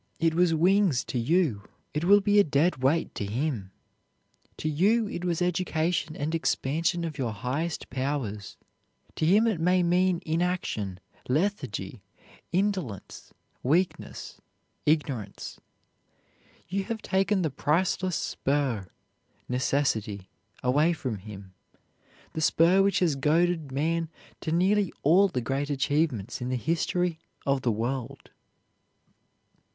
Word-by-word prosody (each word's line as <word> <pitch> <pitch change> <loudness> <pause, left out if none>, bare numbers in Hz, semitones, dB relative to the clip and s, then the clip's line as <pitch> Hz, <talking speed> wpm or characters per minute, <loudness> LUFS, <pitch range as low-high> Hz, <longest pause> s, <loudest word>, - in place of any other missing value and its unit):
It 165 -1 +2
was 175 +1 +3
wings 175 -3 +3
to 125 - -3
you, 145 - +1 0.3
it 150 +3 -1
will 205 +2 +6
be 205 +1 +4
a - - +7
dead 155 +2 +2
weight 145 +5 +1
to - - -4
him; 110 -1 -2 0.9
to - - -3
you 205 +9 +2
it 175 - -5
was 175 -1 0
education 170 -2 0
and 150 +3 -3
expansion 165 +2 0
of 155 -3 -6
your 120 -4 -1
highest 130 - -3
powers; 130 -6 -3 0.6
to 155 - 0
him 205 +6 +5
it 220 -7 +1
may 180 +2 +3
mean 180 +1 +2
inaction, 160 - -1 0.3
lethargy, 130 - -1 0.5
indolence, 185 - -2 0.3
weakness, 170 +8 -1 0.5
ignorance. 135 -10 -1 1.1
You 195 +3 -2
have 225 0 -4
taken 190 0 +1
the 155 - 0
priceless 175 +5 0
spur 135 -8 -1 0.6
necessity 120 -7 -1 0.3
away 145 +7 +3
from 125 -10 -4
him, 95 -1 -11 0.8
the 160 - -3
spur 170 +5 +4
which 195 -1 +2
has 165 -6 +3
goaded 160 +1 +1
man 165 +4 0 0.3
to 160 - -4
nearly 190 +3 +2
all 180 +7 +6
the 155 -10 -3
great 135 +4 -2
achievements 140 -6 0
in 125 - -3
the 130 - 0
history 170 +3 0 0.3
of 140 -1 +1
the 120 - +1
world. 120 +3 -4
155 Hz, 125 wpm, -27 LUFS, 130-180 Hz, 1.1 s, a